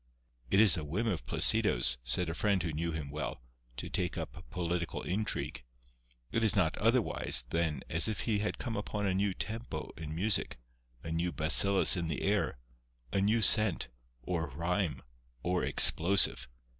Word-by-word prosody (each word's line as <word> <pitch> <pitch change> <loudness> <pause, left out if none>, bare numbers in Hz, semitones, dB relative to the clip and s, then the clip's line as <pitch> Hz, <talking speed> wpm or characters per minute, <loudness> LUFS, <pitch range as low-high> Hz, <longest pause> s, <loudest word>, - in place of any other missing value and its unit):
"It 95 - +2
is 105 -6 +5
a 80 - -4
whim 85 +10 -3
of 90 - -3
Placido's," - - +1
said 65 +9 -1
a 80 - -3
friend 100 -1 0
who 85 -3 -4
knew 85 +2 -3
him 75 -3 -6
well, 75 -3 -5 0.4
"to - - -6
take 90 -2 -3
up - - -7
political 85 +1 -4
intrigue. 105 -8 -3 0.7
It 115 - -1
is 110 - +4
not 90 -5 +1
otherwise 115 - +1
than 80 -5 -2
as 80 +5 +4
if 110 -3 -3
he 110 -3 -1
had 105 - -3
come 115 -3 -5
upon 105 0 -4
a 95 - 0
new 95 0 -1
tempo 115 +2 -6
in 80 -1 -7
music, 90 - 0 0.5
a 80 - -6
new 85 +2 -2
bacillus 95 +6 +5
in 85 -2 -3
the 80 - -4
air, 100 -7 -1 0.6
a 100 - +1
new 110 +3 +1
scent, 110 - +4 0.3
or 80 -2 -3
rhyme, 85 +4 -3 0.4
or 90 +1 -1
explosive. 95 +5 +5
90 Hz, 170 wpm, -31 LUFS, 80-105 Hz, 0.7 s, is